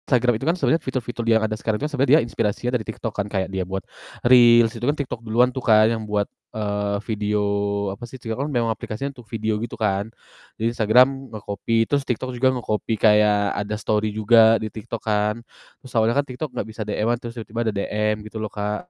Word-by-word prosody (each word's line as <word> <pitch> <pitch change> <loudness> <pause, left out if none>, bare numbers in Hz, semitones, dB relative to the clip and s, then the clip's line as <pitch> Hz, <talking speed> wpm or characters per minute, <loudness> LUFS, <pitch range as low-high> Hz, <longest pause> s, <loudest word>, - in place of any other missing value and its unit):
Instagram 125 -2 +3
itu - - -4
kan 170 - +2
sebenarnya 165 -2 +2
fitur-fitur 125 -2 -4
di 115 - +1
yang 110 - 0
ada 110 0 -2
sekarang 110 0 -2
itu - - -2
kan - - -10
sebenarnya 135 -1 +1
dia - - +2
inspirasinya 115 +1 -2
dari 115 - -1
TikTok 110 0 -5
kan, 100 - -2
kayak 95 -2 -1
dia 95 -1 -1
buat 95 +1 -4 0.4
Reels, 120 -2 +6
itu 115 - -9
kan 145 +4 +2
TikTok 135 -4 -4
duluan 120 +3 +2
tuh 130 - -4
kan 110 -1 +6
yang 110 -1 -4
buat, 105 -1 +1 0.3
eee, 105 -1 -2
video 105 -2 -1 0.5
apa 110 - -12
sih 130 - -9
TikTok 115 -1 -5
kan - - -4
memang 120 -3 +1
aplikasinya 120 +6 -5
untuk 120 -3 -13
video 110 -1 -1
gitu 120 - -5
kan. 100 -1 0 0.5
Jadi 115 +2 -1
Instagram 125 +4 +3
nge-copy, 110 +3 -1
terus 140 -1 +1
TikTok 130 +1 -2
juga 125 +2 +2
nge-copy 110 -2 -2
kayak 105 -1 +3
ada 105 +1 -3
story 110 0 0
juga 110 +1 +5
di 110 - -4
TikTok 115 0 -6
kan. 105 -1 +1 0.4
Terus 130 - -14
awalnya 115 +3 +3
kan 145 - +2
TikTok 130 +4 -5
gak - - -4
bisa 110 0 -8
DM-an 110 +3 0
terus 120 0 -8
tiba-tiba 115 0 -3
ada - - -3
DM 105 +1 -1
gitu 110 +1 -8
loh, 110 - -3
Kak. 105 +12 -4
110 Hz, 220 wpm, -22 LUFS, 105-120 Hz, 0.5 s, Reels